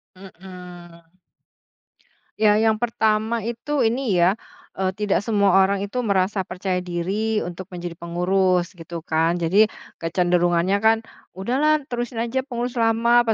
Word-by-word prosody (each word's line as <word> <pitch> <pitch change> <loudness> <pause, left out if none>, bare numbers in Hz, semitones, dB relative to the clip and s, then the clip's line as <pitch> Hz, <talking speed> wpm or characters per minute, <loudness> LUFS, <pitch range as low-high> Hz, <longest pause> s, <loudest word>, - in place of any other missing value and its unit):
Mhm. 180 -2 -12 1.3
Ya 210 -1 +4
yang 220 -1 +3
pertama 220 0 0
itu, 240 +6 -2
ini 235 0 +1
ya, 180 +3 +4 0.4
eee, 190 -1 0
tidak 205 0 0
semua 200 -4 +3
orang 195 +1 0
itu 225 +5 -3
merasa 195 -1 +1
percaya 185 0 -3
diri 195 +5 -1
untuk 175 +2 -6
menjadi 175 -1 -6
pengurus 180 +2 0
gitu 165 0 -7
kan. 165 +2 0
Jadi, 185 +6 +4 0.3
kecenderungannya 175 +1 +1
kan, 220 0 +5 0.4
"Udahlah 275 +10 +1
terusin 240 -1 -3
aja 255 +3 -2
pengurus 245 -1 -4
lama," 235 +1 +3
apa 225 - +2
200 Hz, 130 wpm, -22 LUFS, 180-225 Hz, 1.3 s, kan